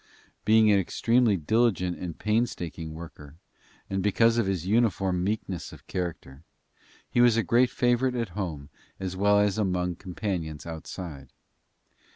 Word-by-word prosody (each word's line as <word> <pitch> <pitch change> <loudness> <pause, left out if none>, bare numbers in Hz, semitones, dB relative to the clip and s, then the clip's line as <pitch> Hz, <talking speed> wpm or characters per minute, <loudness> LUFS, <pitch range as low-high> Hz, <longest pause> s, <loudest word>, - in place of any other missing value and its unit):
Being 110 0 +5
an 100 - +5
extremely 115 +2 +2
diligent 90 0 +1
and 90 -3 -6
painstaking 90 -8 -2
worker, 80 -3 -11 0.5
and 95 0 -2
because 115 +4 +3
of 110 - +1
his 95 -3 -1
uniform 95 -4 +1
meekness 100 -3 -3
of - - -14
character, 80 -6 -5 0.7
he 120 - +2
was 120 -2 +5
a 115 - +2
great 120 +6 +3
favorite 125 +1 +1
at 115 -4 -2
home 85 -7 -5 0.3
as 95 -1 -4
well 100 +2 +4
as 105 0 +1
among 90 -3 0
his 85 - -5
companions 90 -5 -4
outside. 80 -3 -7
95 Hz, 145 wpm, -27 LUFS, 85-110 Hz, 0.7 s, Being